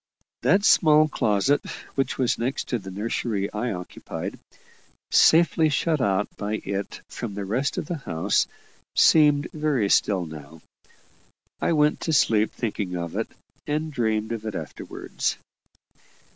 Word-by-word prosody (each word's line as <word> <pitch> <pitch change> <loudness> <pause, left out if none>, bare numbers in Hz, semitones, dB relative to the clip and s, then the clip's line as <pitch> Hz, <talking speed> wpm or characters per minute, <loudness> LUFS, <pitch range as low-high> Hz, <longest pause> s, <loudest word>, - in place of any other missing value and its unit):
That 200 +1 +3
small 155 -5 +6
closet, 120 +1 +1 0.3
which 135 -1 -1
was 125 -3 +1
next 125 +4 -2
to 120 - 0
the 95 - -9
nursery 100 0 -2
I 115 +3 -2
occupied, 90 -1 -7 0.7
safely 160 -1 +5
shut 150 0 +1
out 100 -1 +1
by 105 +1 -2
it 100 0 -4
from 110 -5 -6
the 100 -1 -4
rest 125 +8 -1
of - - -2
the 170 +2 -3
house, 95 - 0 0.5
seemed 150 -1 +5
very 150 -9 0
still 95 -4 +2
now. 80 0 -11 1.0
I - - +2
went 150 -1 +3
to 160 - -2
sleep 110 -6 +3
thinking 105 -5 -3
of 85 -1 -5
it, - - -1 0.4
and 155 +1 -2
dreamed 110 -3 0
of 115 -2 -4
it 110 - -4
afterwards. - - -4
115 Hz, 140 wpm, -25 LUFS, 100-150 Hz, 1.0 s, small